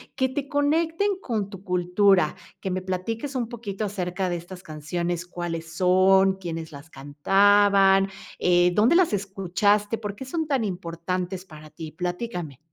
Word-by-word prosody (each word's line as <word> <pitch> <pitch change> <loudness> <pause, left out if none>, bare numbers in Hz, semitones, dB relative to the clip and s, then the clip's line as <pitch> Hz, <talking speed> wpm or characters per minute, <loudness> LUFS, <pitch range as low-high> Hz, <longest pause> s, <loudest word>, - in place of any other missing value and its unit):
que 260 -1 +1
te 280 +1 -4
conecten 325 +7 +1
con 215 -5 -2
tu 195 -1 -11
cultura, 180 -1 +3 0.3
que 190 - -3
me 185 0 -2
platiques 225 +9 -4
un 235 -3 -2
poquito 220 -4 -5
acerca 190 -2 -2
de 175 - -1
estas 180 +2 -10
canciones, 170 +3 -3
cuáles 165 -2 -5
son, 190 +1 +4
quiénes 165 -3 -6
las 140 +2 -12
cantaban, 195 +7 +4 0.3
eh, 175 0 +4
dónde 225 - +4
las 360 -6 +4
escuchaste, 205 +2 0
por 205 -2 -5
qué 265 - -8
son 315 +4 -3
tan 270 -5 +1
importantes 180 0 -4
para 155 -4 -13
ti, 155 0 -9
platícame. 175 - -4
190 Hz, 150 wpm, -25 LUFS, 175-210 Hz, 0.3 s, son